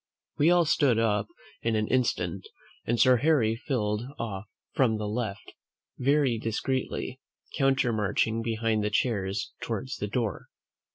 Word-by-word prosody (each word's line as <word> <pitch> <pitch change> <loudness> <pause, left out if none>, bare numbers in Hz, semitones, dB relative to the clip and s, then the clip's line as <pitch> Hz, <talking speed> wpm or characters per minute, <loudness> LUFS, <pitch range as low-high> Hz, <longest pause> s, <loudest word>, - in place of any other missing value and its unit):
We 150 +3 +5
all 175 -1 +5
stood 140 -6 +3
up 105 -3 +1 0.3
in 115 -1 0
an 110 0 +1
instant, 130 -2 0 0.4
and 120 0 +1
Sir 130 -1 +6
Harry 125 -5 +3
filed 110 -4 -1 0.2
off 105 -4 -4 0.3
from 115 -5 +2
the 105 -1 -3
left, 105 -2 -4 0.5
very 135 -3 +2
discreetly, 130 +3 -2 0.4
countermarching 115 -5 +1
behind 115 -1 0
the 105 - +1
chairs 100 -3 -1
towards 115 +4 -4
the 105 - -3
door. 105 -3 -2
115 Hz, 130 wpm, -28 LUFS, 105-130 Hz, 0.5 s, Sir